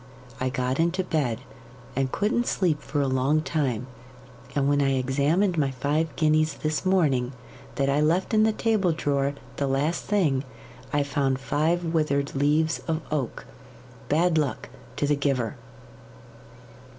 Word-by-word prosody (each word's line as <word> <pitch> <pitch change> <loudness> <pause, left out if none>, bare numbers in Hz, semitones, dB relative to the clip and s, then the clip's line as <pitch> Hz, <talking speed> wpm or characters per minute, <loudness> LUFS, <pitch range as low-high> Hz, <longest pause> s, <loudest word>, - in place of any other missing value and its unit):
I 130 - 0
got 130 +1 -1
into 170 +3 +1
bed, 135 -9 -1 0.5
and 135 0 0
couldn't 220 +4 0
sleep 160 -6 +1
for 145 +1 -2
a 140 - +1
long 135 +4 +2
time; 135 -8 -1 0.7
and 140 -1 +2
when 145 0 +3
I 135 -1 +2
examined 150 +8 +1
my 140 -2 +2
five 145 +5 0
guineas 155 0 +2
this 155 0 -2
morning, 145 -10 +2 0.4
that 135 - +1
I 140 +2 +2
left 170 +7 +1
in 215 - +5
the 220 0 +4
table 215 -6 +1
drawer 140 -2 0 0.2
the 140 - 0
last 140 +5 0
thing, 155 -11 +1 0.5
I 145 -1 +2
found 140 -2 0
five 155 +6 0
withered 145 -3 +1
leaves 150 +3 +2
of 160 -1 -1
oak 140 -6 -2 0.6
bad 165 +1 +3
luck 145 -4 -2 0.3
to - - 0
the 145 +1 +2
giver! 135 -5 -1
145 Hz, 150 wpm, -26 LUFS, 135-160 Hz, 0.7 s, in